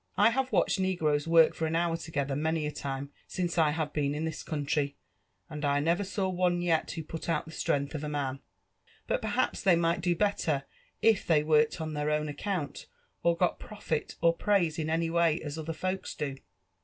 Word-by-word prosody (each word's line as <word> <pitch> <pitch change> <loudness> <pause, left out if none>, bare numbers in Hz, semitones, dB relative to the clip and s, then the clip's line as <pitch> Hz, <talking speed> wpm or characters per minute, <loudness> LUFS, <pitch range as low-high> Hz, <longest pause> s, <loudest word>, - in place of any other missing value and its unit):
*' - - -36
I - - +4
have 265 +2 -1
watched - - +2
negroes 160 -6 +1
work 165 -1 +6
tor 160 - -1
an 160 - -1
heur 170 0 +1
togetheir, 145 -4 -2
many 160 +1 0
a 150 - -2
time, 140 0 -5 0.2
since 175 -2 -1
I 155 -2 +5
have 150 -1 -2
been 145 -1 0
in 155 +2 -2
this 160 - -4
country, 145 -1 -1 0.5
and 150 0 -7
I 145 0 +2
Dovor 170 +6 +1
saw 195 0 -1
one 180 -1 +1
yet 165 -2 +1
who 165 - -4
put 160 +2 -6
out 165 - 0
the 160 - -10
stren^h 140 -2 -1
of 150 -1 -4
a 150 - -3
man. 140 -2 -2 0.7
But - - 0
perhaps - - 0
they 185 -3 +5
might 170 0 +1
do 175 -1 +1
better 165 -8 +1 0.4
if 225 -3 +4
they 155 -3 +4
worked 150 0 +3
on 160 -1 -3
Iheir 150 0 -1
own 150 0 -4
accoont, 155 0 -4 0.3
or 170 0 +2
99I 180 0 +1
profit 165 -7 -4
er 170 - +7
praise 170 -3 +1
in 155 0 -1
any 165 0 0
way 170 -1 +3
as 150 0 -5
other 160 +1 -4
folks 185 +4 -3
do." 140 -3 -3
160 Hz, 210 wpm, -30 LUFS, 150-175 Hz, 0.7 s, er